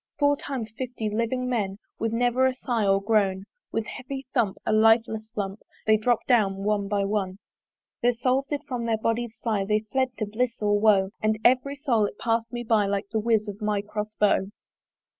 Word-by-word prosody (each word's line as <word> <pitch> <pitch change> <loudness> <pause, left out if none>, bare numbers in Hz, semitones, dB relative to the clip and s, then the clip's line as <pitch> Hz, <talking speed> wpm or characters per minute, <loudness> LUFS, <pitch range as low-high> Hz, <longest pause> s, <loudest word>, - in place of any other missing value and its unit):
Four 285 -1 +3
times 255 -6 -5
fifty 245 -4 -3
living 235 +4 -1
men, 205 -6 -1 0.2
With 225 0 0
never 245 +2 +2
a 260 - -1
sigh 235 -5 -1
or 195 0 +4
groan, 200 -3 +2 0.3
With 225 -1 -1
heavy 265 +3 -6
thump, 225 -7 +1
a - - +1
lifeless 220 0 +3
lump 195 0 -3 0.3
They 220 - +5
dropp'd 225 +2 +1
down 195 -6 +2
one 205 -1 0
by 200 -1 0
one. 195 -2 -1 0.6
Their 245 0 +3
souls 255 +3 0
did 290 0 -3
from 245 -4 -3
their 225 -1 +1
bodies 230 +1 -2
fly, 215 -4 +1
They 210 +2 +1
fled 260 -2 0
to 215 - -1
bliss 230 +3 -2
or 205 -1 +2
woe; 200 -3 +4
And 215 0 +1
every 260 +3 +3
soul 250 -7 +1
it 205 - -10
pass'd 230 0 -1
me 240 -1 -4
by, 220 -3 +2
Like 200 0 -2
the 220 - +1
whiz 220 -1 +1
of 205 +1 -7
my 210 -1 0
Cross 210 +1 -5
bow. 200 -2 +2
220 Hz, 195 wpm, -26 LUFS, 205-245 Hz, 0.6 s, They